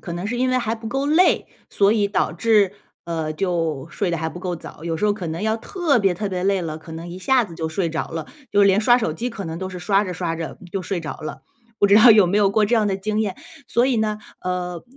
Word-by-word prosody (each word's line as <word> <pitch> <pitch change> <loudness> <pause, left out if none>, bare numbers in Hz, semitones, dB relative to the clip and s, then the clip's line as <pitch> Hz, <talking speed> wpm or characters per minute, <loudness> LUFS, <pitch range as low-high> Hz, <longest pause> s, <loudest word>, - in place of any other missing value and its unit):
可 170 - -7
能 175 +3 -4
是 235 +4 -2
因 255 +1 +1
为 255 0 +2
还 230 -2 -1
不 225 0 -9
够 270 +4 -1
累， 325 +5 +3 0.2
所 200 0 +3
以 210 -2 +1
导 200 - 0
致， 210 -4 +3 0.3
呃， 160 -2 -3
就 165 -5 -1
睡 185 +3 -1
得 170 - 0
还 160 0 -2
不 175 - -9
够 180 -1 -3
早。 160 - -11
有 165 -1 -2
时 185 - -2
候 210 - +4
可 195 -4 -5
能 160 +3 -4
要 220 +1 +1
特 320 - 0
别 195 -4 +2
特 205 +3 -3
别 180 -1 -3
累 195 -1 +2
了， 155 -1 -4
可 160 +1 -12
能 165 +2 -7
一 175 +2 -7
下 255 +5 +3
子 175 -5 -11
就 160 -1 -3
睡 170 +1 -1
着 160 - -3
了， 160 -2 -5 0.2
就 205 0 +4
连 200 +1 +5
刷 240 +2 +5
手 190 -10 -1
机 240 +10 -3
可 215 -4 -6
能 165 0 -5
都 190 +1 -4
是 180 -1 -7
刷 195 +2 +2
着 185 - -4
刷 165 -1 -2
着 165 -1 -6
就 195 - -2
睡 185 0 -3
着 155 - -6
了。 155 - -7 0.4
不 205 - +6
知 200 - +5
道 220 +3 +9
有 210 -4 +7
没 185 +4 +1
有 205 -2 +4
过 215 +1 +3
这 220 +4 +1
样 215 -3 +2
的 195 - 0
经 210 +2 -2
验？ 200 -4 -2 0.3
所 240 +2 +3
以 260 -2 +1
呢， 215 -1 0 0.2
呃， 180 -1 -3
195 Hz, 300 characters per minute, -22 LUFS, 170-220 Hz, 0.4 s, 道